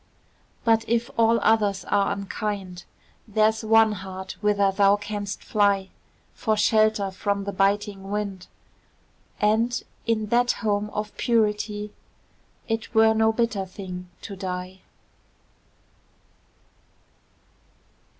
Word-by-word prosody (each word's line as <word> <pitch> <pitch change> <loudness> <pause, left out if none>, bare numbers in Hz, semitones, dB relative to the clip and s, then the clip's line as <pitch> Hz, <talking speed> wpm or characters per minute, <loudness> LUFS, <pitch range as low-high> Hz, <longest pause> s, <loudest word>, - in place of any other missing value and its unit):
But, 225 -1 +3
if 235 0 0
all 230 0 +4
others 205 -3 +2
are 200 -1 +1
unkind, 200 -2 -4 0.4
There's 220 +1 +2
one 220 0 +5
heart 190 -1 -7
whither 200 -2 +3
thou 200 +1 +4
canst 205 -1 -5
fly 200 -2 +1 0.4
For 215 -2 0
shelter 215 -2 +3
from 200 +1 -2
the 200 - -3
biting 200 0 0
wind; 200 -3 -4 0.9
And, 225 +3 +1 0.2
in 220 -2 +1
that 245 +1 +3
home 210 -1 -1
of 210 0 -5
purity, 210 -2 0 0.7
It 225 +1 -3
were 220 0 +6
no 220 0 +3
bitter 225 -3 0
thing 180 -1 -8
to 200 - -7
die. 185 0 -5
210 Hz, 105 wpm, -25 LUFS, 195-220 Hz, 0.9 s, were